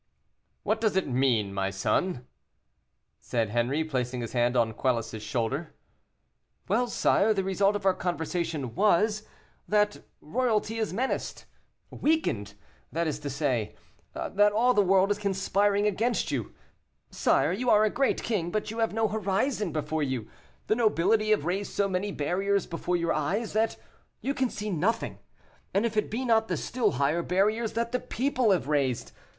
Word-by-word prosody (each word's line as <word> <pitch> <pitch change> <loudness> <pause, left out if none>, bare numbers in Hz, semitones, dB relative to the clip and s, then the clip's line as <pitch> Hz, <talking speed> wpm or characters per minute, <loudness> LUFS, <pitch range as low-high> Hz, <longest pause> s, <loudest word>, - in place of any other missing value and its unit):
"What 220 +1 0
does 215 -4 +1
it 190 - +1
mean, 125 -6 +1
my 95 0 -1
son?" 115 - -1 0.9
said 115 -3 -1
Henri, 120 +7 +1
placing 125 -5 -2
his 115 - -6
hand 120 0 +2
on 115 -2 +2
Quelus's 115 -3 -1
shoulder. 120 +8 -3 0.9
"Well, 235 +6 +2
sire, 220 -2 +2
the 195 - 0
result 195 +2 +2
of 205 - -4
our 190 - +5
conversation 165 -6 -3
was, 210 +2 +2 0.4
that 210 0 +1 0.2
royalty 225 +4 -1
is 220 - -1
menaced 250 +8 -3 0.5
weakened, 115 - 0 0.4
that 170 +2 -1
is 150 -2 -2
to 145 -1 -5
say, 130 -6 -1 0.4
that 205 +1 +2
all 240 +4 +3
the 210 - +4
world 195 +1 +3
is 205 - 0
conspiring 200 +1 +1
against 220 +4 0
you. - - -3 0.6
Sire, - - +2
you 240 +7 -1
are 210 -1 +6
a 215 - +1
great 275 +1 0
king, 195 -8 -1
but 215 +3 -2
you 225 - -6
have 225 -1 0
no 225 0 +2
horizon 210 0 -1
before 155 +1 -2
you; 130 -6 -2 0.4
the 215 - +2
nobility 215 -1 +2
have 215 -8 +2
raised 195 +4 -2
so 200 - +1
many 195 +2 -2
barriers 195 +6 0
before 175 +1 -2
your 170 -1 0
eyes, 195 +10 -1
that 220 +1 +1 0.4
you 275 - -2
can 265 -3 0
see 210 -1 -4
nothing, 200 +7 -1 0.6
if 220 +2 +1
it 215 - +1
be 250 +4 -3
not 225 -2 +3
the - - -1
still 235 -4 0
higher 145 +5 +1
barriers 210 +6 +1
that 235 +1 -1
the 250 - 0
people 255 -2 0
have 185 -8 +2
raised. 140 -5 0
195 Hz, 165 wpm, -28 LUFS, 145-215 Hz, 0.9 s, are